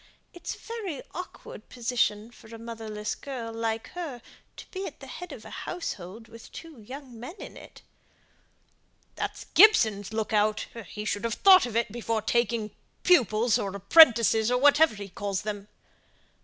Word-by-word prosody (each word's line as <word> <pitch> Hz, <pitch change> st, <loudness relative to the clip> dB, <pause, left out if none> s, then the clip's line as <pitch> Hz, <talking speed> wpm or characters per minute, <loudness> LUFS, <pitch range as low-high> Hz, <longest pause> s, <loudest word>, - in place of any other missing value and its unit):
It's 350 Hz, -, -6 dB
a -, -, -17 dB
very 420 Hz, -, -6 dB
awkward 360 Hz, +2 st, -9 dB
position 235 Hz, -3 st, -1 dB
for 230 Hz, -, -17 dB
a 230 Hz, +1 st, -10 dB
motherless 225 Hz, -2 st, -5 dB
girl 240 Hz, -5 st, -7 dB
like 225 Hz, 0 st, -3 dB
her 295 Hz, -10 st, -7 dB, 0.3 s
to -, -, -9 dB
be 385 Hz, 0 st, -4 dB
at -, -, -11 dB
the -, -, -10 dB
head 360 Hz, -, -8 dB
of -, -, -10 dB
a -, -, -10 dB
household 220 Hz, -, -6 dB
with 230 Hz, 0 st, -14 dB
two 325 Hz, -6 st, -11 dB
young 255 Hz, +1 st, -10 dB
men 255 Hz, +10 st, -8 dB
in -, -, -10 dB
it." -, -, -14 dB, 1.3 s
"That's -, -, -5 dB
Gibson's 220 Hz, -, +5 dB
look 220 Hz, 0 st, -3 dB
out; 215 Hz, 0 st, +2 dB, 0.3 s
he 210 Hz, 0 st, -7 dB
should 205 Hz, 0 st, -2 dB
have 230 Hz, -1 st, -1 dB
thought 375 Hz, -4 st, +6 dB
of 230 Hz, -, -8 dB
it 235 Hz, -2 st, 0 dB
before 225 Hz, -1 st, -2 dB
taking 235 Hz, -2 st, 0 dB, 0.3 s
pupils, 235 Hz, -, +3 dB
or 195 Hz, -1 st, -4 dB
apprentices, 225 Hz, -, +6 dB
or 250 Hz, -, +2 dB
whatever 290 Hz, 0 st, +5 dB
he 200 Hz, -1 st, -7 dB
calls 200 Hz, 0 st, -4 dB
them." 205 Hz, -1 st, -5 dB
230 Hz, 165 wpm, -27 LUFS, 215-275 Hz, 1.3 s, thought